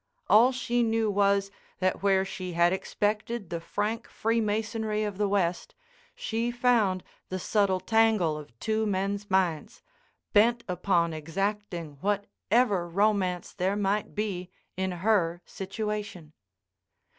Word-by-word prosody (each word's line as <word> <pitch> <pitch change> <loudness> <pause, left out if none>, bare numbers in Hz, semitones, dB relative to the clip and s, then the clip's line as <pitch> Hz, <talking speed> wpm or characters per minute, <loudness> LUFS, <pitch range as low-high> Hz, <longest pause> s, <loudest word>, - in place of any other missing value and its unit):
All 235 +5 +7
she 240 -1 0
knew 225 -2 +1
was, 200 0 +2 0.3
that 185 0 0
where 195 -1 +3
she 185 -2 -6
had 170 +1 +4
expected 210 +1 -2
the 170 -1 -3
frank 215 +6 -2
freemasonry 220 -1 -1
of 205 -2 -4
the 205 - +2
West, 180 -3 0 0.4
she 230 +1 -2
found 240 -7 +2 0.3
the 185 - -2
subtle 195 0 +1
tangle 215 -5 +3
of 145 -7 -10
two 220 0 0
men's 200 +1 -2
minds, 190 +2 0 0.5
bent 235 +3 +4
upon 175 -2 +1
exacting 170 -1 -3
whatever 205 -1 0
romance 190 -1 +1
there 190 +1 0
might 205 +1 -1
be 195 -4 -3 0.3
in 190 0 -1 0.2
her 175 -6 +2
situation. 205 -5 -5
200 Hz, 120 wpm, -28 LUFS, 185-220 Hz, 0.5 s, All